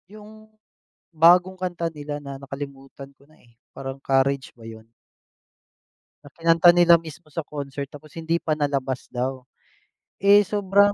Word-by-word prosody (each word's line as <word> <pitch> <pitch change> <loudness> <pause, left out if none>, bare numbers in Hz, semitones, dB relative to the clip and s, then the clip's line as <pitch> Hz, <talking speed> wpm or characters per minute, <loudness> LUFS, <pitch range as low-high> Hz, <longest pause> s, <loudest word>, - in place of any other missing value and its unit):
Yung 215 +1 -14 0.7
bagong 175 +3 +5
kanta 180 -2 -4
nila 145 0 -6
na, 140 -2 -9
nakalimutan 135 0 -9
ko 135 - -28
na, 155 - -23
eh, 120 -1 -26 0.2
parang 135 0 -8
Courage 135 0 +1
ba 115 - -12
'yon? 110 0 -11 1.4
Na 145 - -13
kinanta 165 +1 +5
nila 175 -1 +6
mismo 155 -2 -13
sa 165 - -2
concert, 140 -1 -7
tapos 150 +1 -14
hindi 165 0 -1
pa 160 -2 -2
nalabas 140 -3 -2
daw. 130 +1 -3 0.8
Eh, 200 +1 +6
sobrang 200 0 +2
150 Hz, 145 wpm, -23 LUFS, 135-175 Hz, 1.4 s, nila